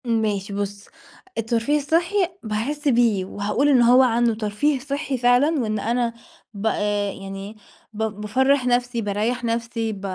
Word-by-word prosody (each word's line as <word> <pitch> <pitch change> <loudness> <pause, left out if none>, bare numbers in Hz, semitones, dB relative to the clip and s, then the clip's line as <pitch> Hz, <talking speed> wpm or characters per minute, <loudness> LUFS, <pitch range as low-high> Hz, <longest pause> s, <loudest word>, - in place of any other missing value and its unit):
ماشي 210 -4 -1
بُص، 200 0 -4 0.5
الترفيه 230 +5 +1
الصحي 330 +6 0 0.3
باحس 245 +8 -3
بيه، 230 -7 +3
وهاقول 205 +8 -1
إن 260 -4 +5
هو 245 +2 +6
عنده 235 -2 +3
ترفيه 225 +7 0
صحي 280 0 -3
فعلًا، 250 +6 +3
وإن 215 -2 -1
أنا 235 +2 0 0.4
ب 200 +1 -6
آآ، 205 -2 0
يعني 195 +1 -7
إيه - - -15 0.4
ب 220 +1 -3 0.2
بافَرّح 265 +5 +2
نَفْسي، 245 -1 +1
باريّح 220 +4 -1
نَفْسي، 230 -1 -2
ب 195 - -9
230 Hz, 150 wpm, -22 LUFS, 210-255 Hz, 0.5 s, هو